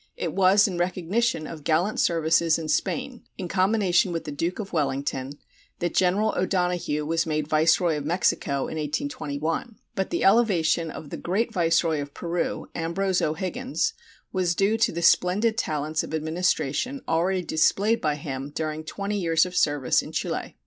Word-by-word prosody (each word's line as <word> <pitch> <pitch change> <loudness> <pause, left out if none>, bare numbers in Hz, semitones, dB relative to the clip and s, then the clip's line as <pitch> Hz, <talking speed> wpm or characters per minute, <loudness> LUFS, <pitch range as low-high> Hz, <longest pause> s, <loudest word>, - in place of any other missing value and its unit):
It 485 - -3
was 195 +2 +5
in 180 -3 -4
recognition 185 +1 0
of 155 -1 -8
gallant 170 +8 +1
services 165 0 +3
in 160 -1 -5
Spain, - - -1 0.2
in 180 - -4
combination 190 -1 +2
with 165 -1 -3
the 150 - -6
Duke 165 +5 -2
of 200 -4 -6
Wellington, 140 -3 -1 0.4
that 175 -1 -2
General 195 +4 +2
O'Donoghue 180 -5 0
was 165 +1 0
made 155 -1 -1
viceroy 160 +1 +3
of 145 - -4
Mexico 150 -4 0
in 160 - -4
1821, 155 - -3 0.2
but 190 - -2
the 345 - -1
elevation 175 -7 +3
of 150 -1 -9
the - - -4
great 220 +6 -1
viceroy 165 -4 +2
of 145 0 -8
Peru, 170 0 -3
Ambrose 180 +3 -1
O'Higgins, 250 - -1 0.4
was 180 -3 +1
due 200 +4 +2
to 225 +1 +2
the 170 +1 -4
splendid 200 +7 +3
talents 155 -6 -1
of 160 - -5
administration 165 - -1
already 180 +3 +1
displayed 200 +8 +2
by 150 -1 +1
him 140 -1 -5
during 155 +1 -4
twenty 200 +5 -3
years 165 -2 +3
of 180 0 -7
service 145 -6 +2
in - - -9
Chile. - - -3
170 Hz, 165 wpm, -25 LUFS, 155-195 Hz, 0.4 s, was